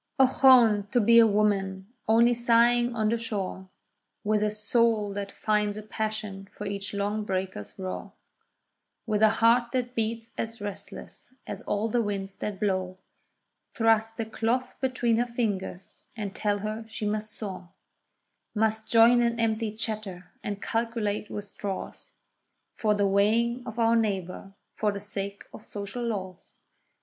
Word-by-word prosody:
Ochone! 255 Hz, -6 st, +6 dB
to 245 Hz, -, +2 dB
be 235 Hz, +1 st, +6 dB
a 230 Hz, -, +7 dB
woman, 200 Hz, -1 st, 0 dB
only 230 Hz, +2 st, +5 dB
sighing 240 Hz, 0 st, +3 dB
on 215 Hz, -1 st, +1 dB
the 230 Hz, +1 st, 0 dB
shore— 195 Hz, -4 st, -4 dB, 0.5 s
With 210 Hz, 0 st, +1 dB
a 210 Hz, -, +2 dB
soul 215 Hz, 0 st, +1 dB
that 200 Hz, 0 st, -4 dB
finds 210 Hz, -1 st, 0 dB
a 215 Hz, -, -6 dB
passion 215 Hz, -2 st, -4 dB
for 210 Hz, -, -8 dB
each 200 Hz, 0 st, -3 dB
long 205 Hz, +2 st, -1 dB
breaker's 190 Hz, -, -4 dB
roar, 185 Hz, -1 st, -5 dB, 0.9 s
With 215 Hz, -2 st, 0 dB
a 220 Hz, -, +7 dB
heart 235 Hz, +2 st, +3 dB
that 250 Hz, -1 st, -1 dB
beats 230 Hz, 0 st, -2 dB
as 230 Hz, 0 st, -3 dB
restless 205 Hz, -1 st, -8 dB, 0.2 s
as 205 Hz, +1 st, -6 dB
all 210 Hz, -1 st, -1 dB
the 235 Hz, +2 st, +1 dB
winds 200 Hz, -2 st, -3 dB
that 205 Hz, -2 st, -4 dB
blow— 185 Hz, -3 st, -1 dB, 0.8 s
Thrust 225 Hz, 0 st, +2 dB
a 225 Hz, -, 0 dB
cloth 235 Hz, +3 st, -1 dB
between 250 Hz, -3 st, +1 dB
her 240 Hz, +1 st, +1 dB
fingers, 205 Hz, -6 st, -4 dB
and 205 Hz, -3 st, -4 dB
tell 205 Hz, -1 st, 0 dB
her 215 Hz, +2 st, -4 dB
she 220 Hz, -1 st, -5 dB
must 215 Hz, +1 st, -1 dB
sew; 190 Hz, -5 st, -6 dB, 0.9 s
Must 220 Hz, 0 st, 0 dB
join 235 Hz, +1 st, +6 dB
in 235 Hz, -1 st, +1 dB
empty 225 Hz, -1 st, 0 dB
chatter, 210 Hz, -4 st, -5 dB
and 205 Hz, -1 st, -4 dB
calculate 225 Hz, -2 st, -2 dB
with 205 Hz, -, -5 dB
straws— 200 Hz, -1 st, -6 dB, 0.6 s
For 215 Hz, -1 st, +1 dB
the 205 Hz, -1 st, +2 dB
weighing 225 Hz, +5 st, +2 dB
of 225 Hz, 0 st, -7 dB
our 230 Hz, 0 st, +4 dB
neighbour—for 195 Hz, 0 st, -2 dB
the 200 Hz, -, -5 dB
sake 200 Hz, 0 st, -5 dB
of -, -, -10 dB
social 205 Hz, +4 st, -6 dB
laws. 190 Hz, -5 st, -5 dB
215 Hz, 150 wpm, -27 LUFS, 200-230 Hz, 0.9 s, a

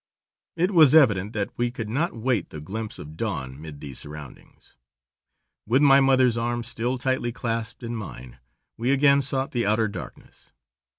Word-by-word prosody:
It 180 Hz, +4 st, +1 dB
was 155 Hz, -6 st, +6 dB
evident 105 Hz, -8 st, +4 dB
that 105 Hz, -3 st, -2 dB
we 120 Hz, 0 st, +1 dB
could 115 Hz, -2 st, -6 dB
not 145 Hz, +10 st, -1 dB
wait 115 Hz, -4 st, -1 dB
the 80 Hz, -, -8 dB
glimpse 110 Hz, +8 st, -6 dB
of 75 Hz, +1 st, -10 dB
dawn 65 Hz, -2 st, -4 dB
'mid 75 Hz, -2 st, -10 dB
these 70 Hz, -4 st, -6 dB
surroundings. 75 Hz, -2 st, -11 dB, 0.9 s
With 130 Hz, +6 st, +3 dB
my 135 Hz, -1 st, +7 dB
mother's 130 Hz, -3 st, +3 dB
arm 120 Hz, 0 st, -2 dB
still 120 Hz, +2 st, -2 dB
tightly 130 Hz, -1 st, -1 dB
clasped 115 Hz, +1 st, -4 dB
in 120 Hz, 0 st, -4 dB
mine, 65 Hz, -, -9 dB, 0.4 s
we 120 Hz, +3 st, -1 dB
again 140 Hz, 0 st, +4 dB
sought 135 Hz, 0 st, -1 dB
the 120 Hz, -4 st, -1 dB
outer 110 Hz, +1 st, +2 dB
darkness. 100 Hz, -, -11 dB
115 Hz, 165 wpm, -25 LUFS, 100-130 Hz, 0.9 s, my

